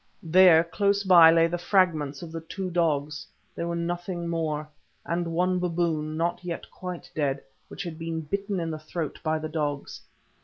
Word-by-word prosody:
There, 170 -1 +6
close 200 +4 0
by, 175 -4 +8
lay 165 0 +5
the 170 +1 -2
fragments 170 -6 +1
of 165 - -8
the 165 0 -5
two 185 +3 -5
dogs—they 155 -2 -2
were 170 0 -2
nothing 175 +1 -3
more—and 160 +1 -4
one 180 +2 +1
baboon, 165 -3 -1
not 170 +2 -1
yet 175 -2 -5
quite 180 -2 -8
dead, 140 -3 -1 0.2
which 195 - -7
had 170 -3 -7
been 165 0 -3
bitten 200 +4 -3
in 165 -1 -2
the 155 - -5
throat 155 0 -5
by 160 -1 0
the 155 0 -4
dogs. 145 -3 -3
165 Hz, 165 wpm, -26 LUFS, 155-175 Hz, 0.2 s, by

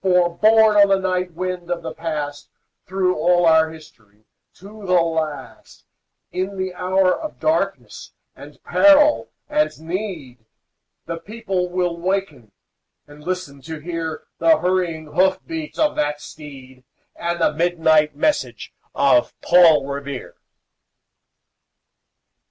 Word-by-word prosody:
For, 180 -2 +2
borne 220 +2 +5
on 200 -1 +7
the 195 -1 +3
night 185 -1 -2
wind 180 0 -5
of 175 -1 -3
the - - -5
Past, 150 -3 -5 0.4
Through 185 -1 0
all 175 +2 +3
our 160 -1 +4
history, 110 -10 -17 0.3
to 205 +3 -13
the 180 -2 +3
last, 160 -3 -4 0.5
In 190 +2 -3
the 185 -1 -3
hour 185 +1 +1
of 310 - -8
darkness 315 +1 -2 0.2
and - - -13
peril 300 0 +4 0.2
and 300 - 0
need, 160 - -6 0.6
The 165 0 -5
people 195 -3 -3
will 175 -1 -1
waken 170 - -3 0.5
and 145 0 -16
listen 180 -6 -5
to 160 +4 -7
hear 165 0 -5 0.2
The 325 -1 +5
hurrying 180 -3 -1
hoof 190 +1 +3
beats 325 -2 -6
of 305 -1 +1
that 150 0 -1
steed, 135 -4 -12 0.3
And 170 0 -3
the 165 - +2
midnight 160 -2 +2
message 295 - -1 0.2
of 305 - +2
Paul 165 -5 +5
Revere. 140 -1 -6
175 Hz, 125 wpm, -21 LUFS, 155-190 Hz, 0.6 s, on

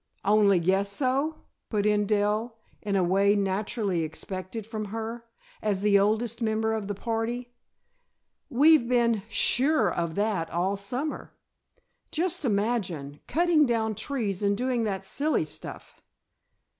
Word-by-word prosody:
"Only 200 -2 +4
guess 190 +4 +1
so?" 275 +7 -1 0.3
put 210 -2 0
in 210 -1 +2
Dell, 215 +2 0 0.2
in 205 -2 -2
a 190 - +3
way 195 +3 +3
naturally 200 -1 -1
expected 185 +6 -5
from 215 -1 -5
her, 225 +3 -5 0.4
as 205 -3 0
the 200 -1 +5
oldest 220 +3 0
member 220 0 0
of 215 -3 -3
the 205 - -3
party. 235 +3 -3 1.0
"We've 285 -1 +5
been 235 -3 +2
sure 245 - +3
of 170 -2 -2
that 200 -6 0
all 180 +4 0
summer. 245 +10 -4 0.7
Just 350 +1 0
imagine, 200 - -1
cutting 330 -3 +3
down 220 -2 0
trees 215 -5 -3
and 200 0 +1
doing 245 -1 0
that 195 -3 -3
silly 305 +2 +1
stuff!" - - -9
215 Hz, 130 wpm, -27 LUFS, 200-240 Hz, 1.0 s, the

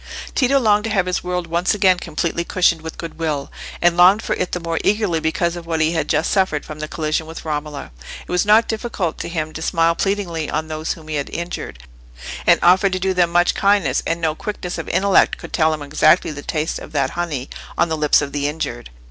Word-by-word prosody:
Tito 270 0 +3
longed 210 -3 +3
to - - -1
have 195 -4 +1
his 180 0 -2
world 180 -1 -2
once 170 +5 0
again 185 -3 +3
completely 170 +1 -2
cushioned 170 -2 +2
with 160 0 -8
goodwill, 160 -4 -4 0.3
and 175 0 +4
longed 185 +5 +6
for - - -1
it 180 - -2
the 180 - -2
more 165 -1 -2
eagerly 205 -5 +1
because 170 +2 0
of 170 -1 -8
what 165 -1 -1
he 155 +1 +2
had 165 -1 -1
just 160 - +1
suffered 190 -7 +1
from 155 0 -8
the 155 - -4
collision 155 0 -2
with 165 0 -9
Romola. 150 - -4 0.4
It - - -8
was 180 0 +2
not 215 +2 +5
difficult 215 -7 -3
to - - -4
him 155 -2 -3
to 160 - -7
smile 165 0 +2
pleadingly 175 -5 -2
on 155 +1 -2
those 155 +1 -2
whom 160 -2 -14
he 155 -1 -2
had 140 - -3
injured, 170 - -6 0.6
and - - +6
offer 185 +3 +5
to 185 - -2
do 190 +1 0
them 175 -2 +2
much 175 +1 +3
kindness: 200 -5 +2
and 165 0 -1
no 160 -2 0
quickness 180 +1 -5
of - - -6
intellect 200 0 +3
could - - -11
tell 160 -2 +3
him 155 -2 -4
exactly 155 +2 +3
the 145 -1 -7
taste 155 +1 -2
of - - -11
that 135 -3 0
honey 155 -7 -3 0.3
on 170 - +2
the 160 - 0
lips 150 -1 +3
of 140 - -5
the 145 0 -1
injured. 145 - -4
170 Hz, 230 wpm, -20 LUFS, 155-185 Hz, 0.6 s, longed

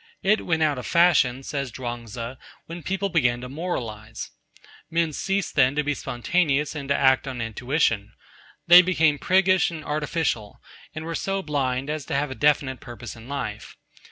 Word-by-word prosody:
It 210 +3 +2
went 160 -2 +2
out 145 -4 +1
of - - -6
fashion, 140 -7 +3
says 140 -2 -4
Chuang 120 -1 -5
Tzu, 115 +2 -6 0.3
when 170 +1 -8
people 195 +5 -2
began 125 -9 +2
to 125 - -6
moralise. 115 -9 -5 0.6
Men 165 -1 0
ceased 195 +5 -1
then 135 -1 +3
to 150 - +1
be 145 0 0
spontaneous 145 +3 0
and 140 -3 -6
to 140 - +3
act 130 0 +3
on 130 -2 -5
intuition. 115 -1 0 0.5
They 175 +1 +10
became 160 -5 +2
priggish 185 0 +3
and 160 -3 -8
artificial, 150 -7 -2 0.4
and 155 0 -5
were 165 - -4
so 195 +3 -2
blind 135 -3 -1
as 155 -3 -4
to - - -3
have 140 0 0
a - - -2
definite 130 0 +1
purpose 120 -1 -9
in 115 +1 -13
life. 140 -1 -5
145 Hz, 175 wpm, -24 LUFS, 125-165 Hz, 0.6 s, They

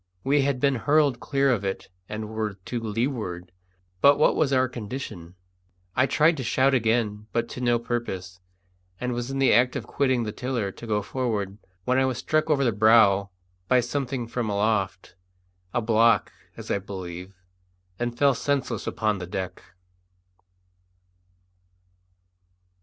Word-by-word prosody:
We 140 +1 +3
had 135 -2 0
been 140 +1 +3
hurled 145 0 +2
clear 140 -1 +1
of 110 -5 0
it 95 -1 -3 0.2
and 110 0 -4
were 110 -2 -2
to 100 +5 -5
leeward; 110 -6 -3 0.5
but 140 0 +7
what - - +4
was 150 -3 +1
our 130 -1 +3
condition? 105 -7 -7 0.6
I 130 - +3
tried 155 +3 +3
to 130 - -3
shout 130 +4 +2
again, 110 -3 0
but 115 0 0
to 125 - -7
no 120 -1 +3
purpose; 95 -7 -4 0.6
and 125 0 -2
was 120 +1 -3
in 135 - -3
the 135 -1 +4
act 125 +4 +4
of 125 -6 -3
quitting 130 -3 +1
the 105 - -3
tiller 120 -4 -2
to 115 - -11
go 105 -2 0
forward 105 -4 -3 0.3
when 130 +1 +2
I 130 - +3
was 130 -3 -1
struck 155 +5 0
over 140 -3 +3
the 120 - +3
brows 105 -2 +5 0.4
by 130 - +4
something 130 -1 -2
from 115 -1 -3
aloft 100 -2 -1 0.6
a 120 - -1
block, 115 0 +3 0.3
as - - -6
I - - +1
believe 95 -1 -8 0.6
and 120 0 -2
fell 140 -1 +4
senseless 140 +2 -2
upon 105 -2 0
the 90 - -6
deck. 95 0 -5
120 Hz, 155 wpm, -25 LUFS, 105-130 Hz, 0.6 s, but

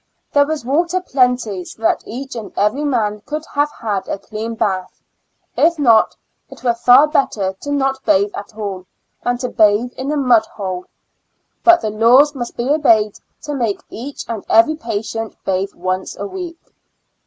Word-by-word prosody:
There. 285 0 +4
was 310 -5 -3
water 340 +7 +1
plenty, 250 - 0
so 225 - -13
that - - +2
each 260 +4 -6
and 220 -3 -6
every 210 +8 +1
man 220 -7 0
could 305 +1 -3
have 290 +1 +2
had 210 -8 -4
a - - -2
clean 220 +3 -6
bath; 190 -4 -2 0.6
if 335 +1 +3
not, 230 -7 +4 0.3
it - - -14
were 240 -2 +3
far 245 +4 +6
better 220 -10 0
to 285 - -5
not 270 -1 0
bathe 200 +2 +2
at 205 +1 -8
all, 195 -4 -5 0.4
than 245 0 0
to 250 0 -3
bathe 215 +3 +3
in 265 +3 -3
a 300 - 0
mud 245 -5 +4
hole. 185 -3 -5 0.8
But 345 0 +6
the 215 -2 -2
laws 245 +7 +5
must 240 -4 -6
be 240 - -2
obeyed 225 -8 +3 0.2
to 295 - -4
make 235 -7 -1
each 275 +5 -7
and 225 -2 -4
every 335 -2 +5
patient 225 -4 -4
bathe 190 +1 -1
once 185 +1 -3
a 200 - -4
week. 345 - -6
235 Hz, 175 wpm, -18 LUFS, 210-285 Hz, 0.8 s, far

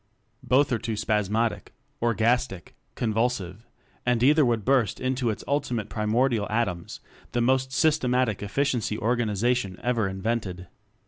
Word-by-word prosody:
Both 135 +2 +2
are 120 - +1
too 110 +1 -3
spasmodic, 110 +1 -1 0.3
orgastic, 115 -4 0 0.2
con 115 -3 -1
vulsive; 110 -2 -2 0.4
and 125 -1 +1
either 150 +3 +5
would 115 -5 0
burst 130 -5 +2
into 130 -1 0
its 110 - -4
ultimate 135 -6 -1
primordial 110 +1 +1
atoms 105 -6 -2 0.3
the 120 - +1
most 130 +2 +2
systematic 130 -7 +1
efficiency 115 0 -1
organization 115 -2 0
ever 120 -4 +1
invented. 95 -2 -3
115 Hz, 125 wpm, -26 LUFS, 105-125 Hz, 0.4 s, either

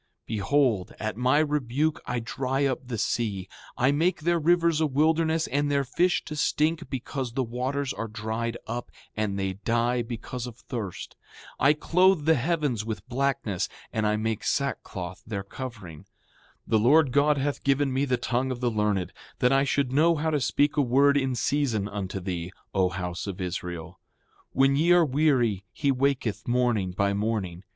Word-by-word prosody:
Behold, 110 -1 +1
at 110 -1 -3
my 125 +4 +2
rebuke 150 0 0
I 120 0 -1
dry 130 +4 -1
up 130 -2 0
the 120 -2 -3
sea, 100 -4 -1 0.3
I 130 +3 +3
make 165 +5 +1
their 170 +2 +2
rivers 170 0 +3
a 155 - +3
wilderness 160 +3 +2
and 145 +1 0
their 140 -1 +2
fish 175 +7 +1
to 155 - -6
stink 155 +2 0
because 130 -1 -4
the 130 - 0
waters 130 +3 -2
are 115 - -4
dried 110 +2 -3
up, 120 +2 -5 0.3
and 105 -2 -1
they 95 -1 -1
die 120 +1 +1
because 120 +1 -5
of 120 - -9
thirst. 110 -8 -6 0.4
7:3 - - +1
I 145 - +7
clothe 180 +1 +3
the 160 - +5
heavens 145 -5 0
with 110 -2 -5
blackness, 125 -7 -1 0.2
and 110 -1 +1
I 105 0 +1
make 110 0 -2
sackcloth 95 -10 -3
their 100 -3 -3
covering. 100 - -8
7:4 - - -18 0.6
The 110 - +2
Lord 140 +5 +5
God 145 +2 +3
hath 140 +1 -2
given 140 -1 +2
me 135 +2 +1
the 130 -2 +1
tongue 125 +2 -1
of 130 -2 -3
the 120 -1 0
learned, 105 -4 0 0.2
that 125 - +3
I 135 0 +4
should 140 -2 0
know 165 +4 +4
how 160 +1 -1
to 150 -2 +1
speak 145 +4 +1
a - - +5
word 140 +2 +4
in 135 -2 +1
season 120 -5 0
unto 100 -2 -4
thee, 90 -1 -4 0.2
O 95 -2 +2
house 90 0 -4
of 95 -2 -5
Israel. 90 -2 -5 0.5
When 135 +1 +3
ye 165 +5 +4
are 175 -2 +5
weary 130 -8 +2
he 140 -2 0
waketh 125 -6 0
morning 120 -6 +1
by 100 +2 +1
morning. 100 -4 -2
125 Hz, 180 wpm, -26 LUFS, 110-145 Hz, 0.6 s, I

